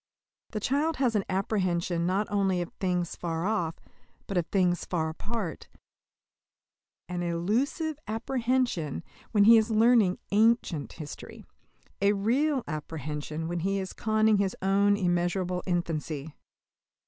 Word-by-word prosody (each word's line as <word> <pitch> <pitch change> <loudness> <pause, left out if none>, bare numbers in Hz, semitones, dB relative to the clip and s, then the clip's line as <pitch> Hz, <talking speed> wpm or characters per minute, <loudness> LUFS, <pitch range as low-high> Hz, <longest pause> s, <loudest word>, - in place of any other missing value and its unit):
The 215 - -3
child 290 +8 +1
has 250 -4 +1
an 205 - +2
apprehension 185 -3 0
not 195 +3 +1
only 195 -3 +2
of 175 - -4
things 180 -2 -1
far 165 0 -3
off, 175 -6 0 0.5
but 195 - -5
of 175 -2 +1
things 180 -3 +1
far 160 -3 -1
apart; 200 +2 -5 1.4
an 180 0 -3
illusive 230 - -1
apprehension 230 - -1 0.3
when 205 -3 +4
he 225 +2 +8
is 220 +1 +2
learning 220 -4 +4
"ancient" 215 - +2
history 150 -3 -9 0.6
a 200 +1 +4
real 255 +7 +1
apprehension 155 0 -4
when 175 +1 -2
he 195 +4 0
is 190 -1 -4
conning 215 0 +2
his 195 -1 0
own 200 +1 +3
immeasurable 180 0 0
infancy. 160 -4 -2
190 Hz, 125 wpm, -28 LUFS, 170-220 Hz, 1.4 s, he